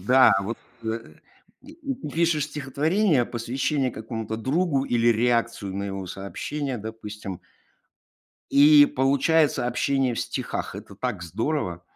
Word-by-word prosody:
Да, 130 +7 +6
вот, 115 +4 -4 0.3
э 110 -8 -4 0.5
И 295 - -11
и 295 -4 -5 0.2
пишешь 165 -3 +2
стихотворение, 150 - +1
посвящение 130 +4 -1
какому-то 110 -1 -5
другу 140 +4 0
или 120 -1 +2
реакцию 115 -4 0
на 100 - -2
его 95 -1 -5
сообщение, 130 +9 -4
допустим 105 -3 -7 1.1
и 145 +1 +8
получается 140 +2 +2
общение 130 +1 +1
в - - -2
стихах. - - -4
Это - - -9
так 105 -3 -3
здорово! 90 - -2
125 Hz, 120 wpm, -25 LUFS, 110-145 Hz, 1.1 s, и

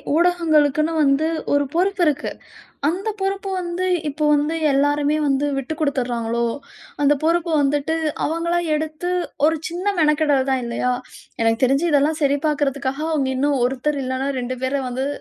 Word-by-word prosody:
ஊடகங்களுக்குன்னு 315 -3 +2
வந்து 280 +2 +3 0.3
ஒரு 285 0 +3
பொறுப்பு 380 +1 +1
இருக்கு. 300 0 -1 0.6
அந்த 370 +6 -2
பொறுப்பு 390 0 -2
வந்து 350 +1 -3 0.2
இப்போ 300 +2 -3
வந்து 295 +3 0 0.2
எல்லோருமே 290 +2 +2
வந்து 280 +1 +1
விட்டுக்குடுத்துறாங்களோ? 250 -5 -1 0.6
அந்த 290 +1 +4
பொறுப்ப 335 +1 +1
வந்துட்டு 290 +3 0 0.3
அவங்களா 340 +2 0 0.2
எடுத்து 315 +3 -3 0.4
ஒரு 320 0 0
சின்ன 350 +4 -5
மெனக்கெடல் 300 -3 +2
தான் 260 -1 +1
இல்லையா? 235 +1 -1 0.5
எனக்கு 225 +1 +1
தெரிஞ்சு 275 +6 +2
இதெல்லாம் 295 +2 +2
சரி 285 0 +3
பார்க்கிறதுக்காக, 280 -2 -1
அவங்க 275 -4 0
இன்னும் 280 0 +1
ஒருத்தர் 275 +3 -2
இல்லைனா 260 +1 -2
2 250 +1 -4
பேர 260 +2 -1
வந்து 255 +2 -2
290 Hz, 140 wpm, -21 LUFS, 270-320 Hz, 0.6 s, அந்த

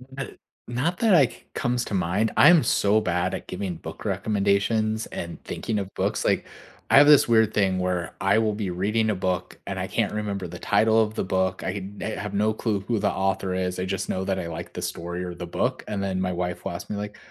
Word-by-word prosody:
Not 135 - -4 0.4
not 140 +10 -1
that, 225 -3 +3
like, 140 -8 +3
comes 120 0 -1
to - - -6
mind 95 +4 +1
I'm 175 -3 +7
so 105 +2 +3
bad 90 -2 0
at - - -8
giving 90 -1 -4
book 80 0 -9
recommendations 105 +2 +1
and 85 0 -6
thinking 110 - -3
of 100 -1 -4
books, - - -1
like, - - +2 0.4
I - - +6
have 145 +1 +8
this 150 -2 +7
weird 110 -2 +4
thing 95 -2 +2
where 90 -2 -2
I 95 +3 +3
will 110 -1 +1
be 100 -4 -3
reading 105 +5 0
a 105 - +1
book 90 -1 -2
and - - -3
I - - -2
can't - - 0
remember 100 -3 -3
the 90 +1 -8
title 110 +4 +3
of 110 0 0
the - - -1
book. 95 0 0
I - - -3 0.3
I - - -3
eh, 110 - -3
have 105 0 -5
no 105 +2 +2
clue 105 -2 -1
who 115 +3 -1
the 100 -1 +1
author 95 -1 -1
is 90 0 -2
I 90 - -1
just 95 0 -3
know 95 - -1
that 95 -1 -1
I 85 - -4
like 80 -1 -7
the - - -5
story 85 +1 -4
or 90 -1 -5
the 90 - -6
book, - - -1
and 105 -2 -3
then 95 -1 -1
my 95 -1 0
wife 90 +1 -3
will 95 - -2
ask 85 0 -7
me, - - -3
like, 105 0 -6
100 Hz, 240 wpm, -25 LUFS, 90-110 Hz, 0.4 s, have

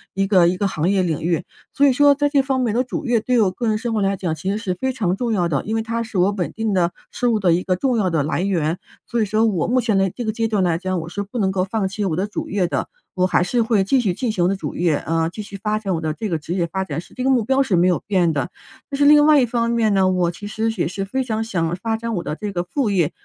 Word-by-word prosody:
一 195 0 +1
个 185 -4 +4
一 180 +1 0
个 200 - +1
行 170 -2 -1
业 195 -1 +2
领 160 -4 -1
域。 170 +1 0 0.3
所 285 - +3
以 270 - +4
说 285 +2 +5
在 290 +1 +1
这 285 -1 +3
方 265 -1 -1
面 240 -4 0
我 - - +2
的 - - +3
主 260 +4 -5
业 240 -2 +2
对 250 +1 +1
我 195 -3 +2
个 235 +5 -3
人 215 -1 +2
生 230 +1 -3
活 215 - 0
来 195 0 +1
讲 175 -4 -2
其 185 +4 -4
实 200 - 0
是 205 -4 -2
非 260 +9 -2
常 200 -8 -1
重 235 +3 -2
要 180 -4 +1
的， 145 -5 -1
因 220 - -2
为 225 - 0
它 230 +1 -2
是 225 -3 -5
我 185 +3 +3
稳 180 -7 -3
定 220 +1 -2
的 175 -2 +1 0.2
收 245 - 0
入 220 - +1
的 180 -4 +3
一 175 - +1
个 185 0 0
重 255 +6 0
要 195 -4 +1
的 160 -4 +1
来 155 +4 -1
源。 175 -3 0 0.3
所 235 - -1
以 - - +2
说 215 +2 +1
我 190 -7 0
目 255 +1 +2
前 215 -4 +1
的 195 - +2
这 240 +6 -6
个 220 - 0
阶 225 +1 -1
段 210 -4 +1
来 170 -2 +1
讲， 185 -1 -2
我 160 - -8
是 200 - -4
不 200 +4 -7
能 195 -4 +1
够 185 -1 0
放 195 0 -1
弃 200 +2 -4
我 170 -5 0
的 185 +4 0
主 210 - -5
业 195 -2 +1
的， - - -2 0.3
我 185 0 +1
还 180 - +2
是 240 +6 0
会 220 -3 +2
继 255 +7 +2
续 200 -7 0
进 245 +1 -1
行 185 -5 0
我 - - +4
的 195 - 0
主 195 - -5
业 170 -3 +2
啊， 165 +2 -1
继 215 +5 -7
续 200 -1 -8
发 215 0 0
展 195 -3 -2
我 160 - -2
的 155 -1 -1
这 215 +6 -4
个 165 - 0
职 155 +3 -5
业 180 -2 0
发 190 +3 -2
展 150 -3 -4
是 - - -18
这 255 - -4
个 265 - +2
目 255 -4 +3
标 265 +3 +2
是 210 -8 0
没 175 - +4
有 180 - +2
变 185 -5 +2
的。 140 -4 -2 0.4
但 275 - -3
是 285 - +3
另 295 0 +7
外 305 -1 +6
一 - - +3
方 235 0 -1
面 225 -3 +2
呢， 190 -1 +3
我 180 -2 +1
其 205 +4 -9
实 220 +2 -1
也 - - +1
是 185 +3 -4
非 260 +7 -2
常 220 -3 -2
想 170 -6 -1
发 225 +3 -2
展 230 0 -4
我 175 - -2
的 150 - -4
这 210 +4 -5
个 175 -2 -2
副 250 +5 -1
业， 175 -7 +1
200 Hz, 355 characters per minute, -21 LUFS, 180-230 Hz, 0.4 s, 另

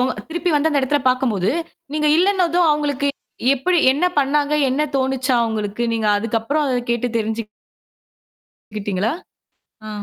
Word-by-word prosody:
உங்க 255 +1 +1 0.2
திருப்பி 345 +2 -1
வந்த 295 +2 +3
அந்த 285 -2 +2
எடத்தல 285 +2 +1
பார்க்கும்போது, 240 -7 +1 0.4
நீங்க 300 0 0
இல்லன்னதும் 355 -2 +2
அவுங்களுக்கு 290 -2 0 0.5
எப்பிடி 350 +7 +1
என்ன 290 +6 -1
பண்ணாங்க? 290 +1 +1
என்ன 265 +4 0
தோணுச்சாம் 260 -2 +1
அவுங்களுக்கு? 215 0 -3
நீங்க 220 -1 -1
அதுக்கப்புறம் 230 +8 -1
அத 255 -2 0
கேட்டு 235 +1 0
தெரிஞ்சுக் 220 0 -3 1.3
கிட்டீங்களா? 200 +1 -1 0.8
ஆ. - - -6
265 Hz, 130 wpm, -20 LUFS, 225-300 Hz, 1.3 s, வந்த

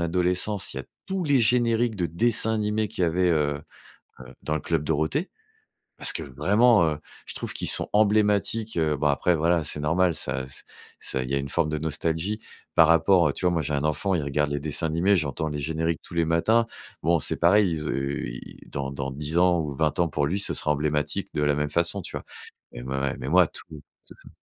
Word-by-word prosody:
adolescence, 90 +2 0
il - - -4
y - - -3
a - - -10 0.2
tous 190 -1 -2
les 145 -4 +3
génériques 115 0 +2
de 90 -4 -1
dessins 110 +6 +1
animés 105 0 -1
qu'il 105 -4 -4
y - - +5
avait, 90 +2 +1
heu 75 -2 0 0.6
heu, 65 - -11 0.2
dans 75 - -2
le - - -2
Club 80 -3 -1
Dorothée. 80 - -1 0.7
Parce - - +5
que - - -4
vraiment, 100 - +3
heu, 75 - -4 0.3
je - - -7
trouve - - -5
qu'ils - - -2
sont - - +1
emblématiques, 105 +1 +2
heu- 80 -2 +1
bon 75 +2 -1
après, 80 +4 +2
voilà, 85 +1 +2
c'est 75 0 -5
normal, 85 +3 +2
ça 65 0 -4
ç 65 - -12 0.3
ça 65 - -4
il 65 - -6
y - - 0
a 70 - +2
une 70 - -4
forme 80 +2 0
de 75 - -2
nostalgie 80 +6 -2 0.3
par 80 -1 +6
rapport 85 0 +4
à - - -1
tu 90 - -7
vois, 90 - +3
moi, 85 - 0
j'ai 75 0 -3
un 70 - -1
enfant, 90 +5 0
il 80 - 0
regarde 70 +1 -1
les 70 - -1
dessins 80 +2 -2
animés, 85 +6 +2
j'entends 80 0 -2
les 75 -1 -4
génériques 80 +2 -2
tous - - -12
les 85 - +2
matins. 110 +9 +2 0.4
Bon, 85 0 +3
c'est - - +1
pareil, 95 +4 +4
il 85 - -2
zeu 70 -2 -3
il - - -10
dans 70 -1 -4
dans 70 -1 -4
10 75 +4 -2
ans 90 -1 +4
ou 75 -3 -4
20 75 +1 0
ans, 85 - +2
pour 75 -1 -1
lui, 95 +7 0
ce 100 - 0
sera 75 - +1
emblématique 75 0 -1
de 75 - -1
la 75 0 +2
même 75 0 -2
façon, 85 +5 +2
tu - - -8
vois? - - -6 0.5
Mais - - -8
m 65 - -8
ouais 70 0 -2
mais 65 - -5
moi, 90 +2 +5
tout - - -9 0.4
c'est - - -15
ça. - - -14
80 Hz, 235 wpm, -25 LUFS, 75-95 Hz, 0.7 s, par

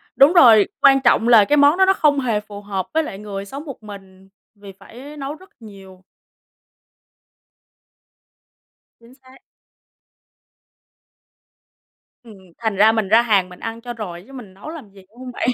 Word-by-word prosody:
đúng 280 +5 +5
rồi, 230 - +6
quan 270 -1 +5
trọng 240 -2 +2
là 225 -4 +6
cái 295 - +1
món 285 +4 +4
đó 380 - +4
nó 385 - +3
không 295 -6 +1
hề 230 -5 -1
phù 205 -1 -12
hợp 195 -3 -5
với 320 0 0
lại 195 - -9
người 200 -1 -8
sống 275 +9 -10
một 270 -7 -11
mình, 195 -2 -14 0.3
vì 200 -1 -13
phải 260 +9 -14
nấu 280 +1 -6
rất 375 +3 -19
nhiều. 195 -3 -15 3.0
Chính 235 +2 -20
xác. 265 0 -21 2.8
Ừm, 220 -4 -15 0.2
thành 220 -3 -3
ra 215 +3 +4
mình 220 -3 -2
ra 220 +4 +4
hàng 200 -6 0
mình 180 - -15
ăn 225 0 -7
cho 240 0 -8
rồi 180 -7 -9
chứ 270 - -16
mình 220 -8 -12
nấu 200 +11 -12
làm 305 -10 -11
gì, 195 - -17
đúng 225 - -27
hông 255 -1 -9
bạn? 245 - -4
225 Hz, 170 wpm, -19 LUFS, 200-270 Hz, 3.0 s, rồi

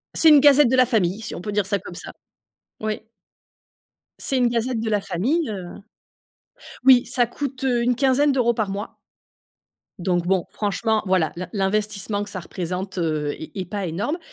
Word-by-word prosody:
C'est 325 - +5
une 295 -2 +8
gazette 285 -2 +6
de 260 - +2
la 255 -1 +5
famille, 205 -2 0
si 225 - -6
on - - -7
peut 210 - -4
dire 205 -2 0
ça 200 0 0
comme 175 -1 -10
ça. - - -7 0.7
Oui 215 0 -2 1.2
c'est 270 - -1
une 245 -1 +3
gazette 235 0 -1
de 225 - -2
la 210 -1 +2
famille, 250 - -1
heu 185 -4 -7 1.1
Oui, 255 -2 +7
ça 245 -1 +1
coûte, 270 +2 -5
heu, 245 -2 +2
une 245 0 +2
quinzaine 275 +2 +3
d'euros 240 -3 +2
par 220 -3 -2
mois 200 +3 -5 1.0
donc, 175 -1 0
bon, 185 -1 +1
franchement, 215 +2 -1
voilà, 185 -4 +1
l'in 180 +1 -6
l'investissement 205 0 -1
que 205 - -9
ça 190 - -5
représente, 185 +2 -5
heu, 155 -4 -1
est 155 - -9
est 190 -2 -3
pas 200 +1 -4
énorme. 205 - -2
210 Hz, 185 wpm, -22 LUFS, 185-250 Hz, 1.2 s, une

